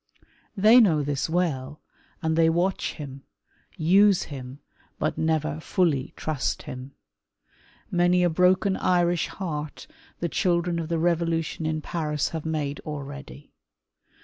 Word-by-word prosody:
They 215 +5 +7
know 165 -10 +4
this 140 0 -2
well, 150 -5 -1 0.4
and 160 0 +1
they 165 0 +4
watch 175 +3 0
him, 140 -3 -8 0.6
use 190 +4 +4
him, 130 -2 -8 0.4
but 155 - -1
never 155 -2 0
fully 160 -6 0
trust 155 -4 -2
him. 130 +2 -8 1.0
Many 175 0 +3
a 175 - +4
broken 185 +3 +3
Irish' 175 -1 +2
heart 155 -6 -5 0.3
the 170 - -2
children 170 +3 0
of 165 -1 -4
the 170 - 0
Revolution 165 -1 0
in 155 0 -1
Paris 150 -4 -2
have 160 -1 -5
made 150 -3 -2
already. 145 -1 -8
160 Hz, 125 wpm, -25 LUFS, 150-175 Hz, 1.0 s, They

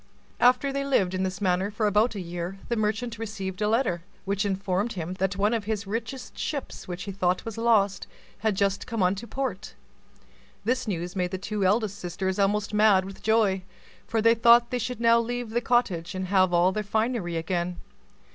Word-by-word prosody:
After 255 +3 +4
they 275 - -1
had 275 - -4
lived 190 -9 +2
in 185 - -1
this 185 0 -2
manner 190 0 +1
about 215 +2 +3
a - - -3
year 175 +1 -5
the 235 - +1
merchant 220 +2 -1
received 200 -3 -5
a 210 - +2
letter, 220 -7 +1 0.2
which 200 +1 0
informed 195 +3 -1
him 175 -1 -4
that 190 +1 0
one 205 +3 +2
of 225 -3 -1
his 215 -1 -2
richest 235 +5 -5
ships, 285 -4 -4
which 180 +1 -5
he 200 - -5
thought 185 -1 0
was 225 -2 -5
lost, 215 -4 +2 0.3
had 215 -1 +1
just 200 0 0
come 225 -4 -1
unto 195 +5 0
port. 245 -7 -4 0.9
This 250 +1 0
news 175 -2 -3
made 180 -1 0
the 190 - -3
two 205 +2 -3
eldest 205 +1 +1
sisters 190 +2 -3
almost 205 +1 +1
mad 210 -3 +5
with 195 0 -10
joy; 215 -4 +2 0.5
for 225 -1 0
they 230 0 +6
thought 235 +1 +5
they 250 - 0
should 235 0 -4
now 230 0 +5
leave 240 0 -3
the 240 +1 0
cottage, 195 -9 0
and 185 -1 -3
have 185 -2 +4
all 175 +1 +4
their 215 - -2
finery 215 -4 -1
again. 175 +1 -2
205 Hz, 195 wpm, -26 LUFS, 185-230 Hz, 0.9 s, they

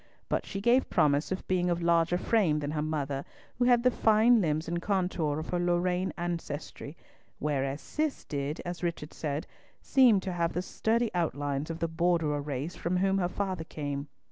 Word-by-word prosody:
But - - -1
she 195 - -4
gave 240 +5 +3
promise 145 +2 +2
of 190 - -3
being 180 -1 +1
of 175 -1 +1
larger 170 0 +3
frame 185 -6 +2
than 145 -1 -2
her 150 -1 -1
mother, 145 -3 -2 0.4
who 245 - +3
had 245 -1 +4
the 250 - +5
fine 225 +1 +4
limbs 155 -2 0
and 170 +1 -2
contour 180 -6 0
of 155 - -5
her 175 - 0
Lorraine 180 +1 +1
ancestry, 170 -3 -5 0.4
whereas 140 -1 -1
Cis 305 - -2
did, 145 +1 -3
as 175 0 -5
Richard 170 -3 -3
said, 150 -1 -3 0.3
seem 250 -7 +5
to 185 -1 -4
have 170 -1 0
the 180 - -1
sturdy 230 +4 0
outlines 145 -4 -1
of 165 - -3
the 165 - -1
Borderer 165 -3 +1
race 145 +3 -4
from 175 +2 -1
whom 195 +1 +2
her 175 -1 0
father 185 -3 -2
came. 145 -2 -4
170 Hz, 185 wpm, -29 LUFS, 150-185 Hz, 0.4 s, the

